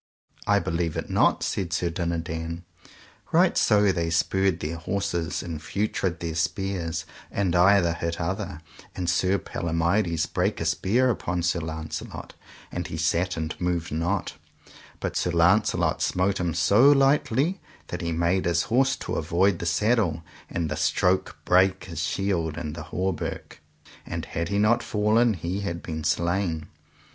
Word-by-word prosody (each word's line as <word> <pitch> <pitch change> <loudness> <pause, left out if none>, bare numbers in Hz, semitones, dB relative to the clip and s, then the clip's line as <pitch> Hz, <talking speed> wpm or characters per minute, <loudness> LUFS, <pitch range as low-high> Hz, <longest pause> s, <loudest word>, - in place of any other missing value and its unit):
I 100 - +4
believe 85 -3 -1
it - - -4
not, - - +3
said 90 -4 -2
Sir 85 -1 0
Dinadan. 85 0 -3 0.7
Right 175 +2 +4
so 105 -2 +4
they 85 -2 -1
spurred 95 +2 +1
their 80 +1 -4
horses 90 -2 -2
and 80 -4 -5
feutred 95 -2 -2
their 85 -1 -3
spears, 85 -1 -2 0.2
and 95 -3 0
either 90 -1 +5
hit 85 -1 -3
other, 90 -1 -3 0.3
and 90 - -3
Sir 90 +3 +2
Palomides 85 0 0
brake - - -1
a - - -2
spear 125 +6 +2
upon 90 -5 -2
Sir 85 +1 +1
Launcelot, 80 -1 -6 0.4
and - - -3
he 80 - -5
sat 85 +3 0
and 80 -1 -2
moved 90 -1 -1
not; 85 +5 -1 0.7
but - - -3
Sir - - 0
Launcelot - - +3
smote 95 +2 +1
him 85 -2 -1
so 100 - +5
lightly 140 - +2 0.3
that 90 - -4
he 85 -1 -2
made 85 +3 +1
his 85 0 +2
horse 130 +3 +2
to - - -6
avoid 85 +3 +2
the 85 - -3
saddle, 95 -3 +1 0.3
and 85 -2 -2
the 80 - -3
stroke 90 +4 +1
brake 95 +1 +3
his - - -7
shield 85 -5 -1
and 75 -3 -4
the 85 - -7
hauberk, 95 -1 -3 0.5
and - - -4
had 85 +1 -3
he 100 - 0
not 110 +3 +3
fallen 110 +2 +2
he 90 +3 -3
had 85 -4 -4
been 80 -2 -5
slain. 85 -1 0
85 Hz, 155 wpm, -26 LUFS, 85-100 Hz, 0.7 s, either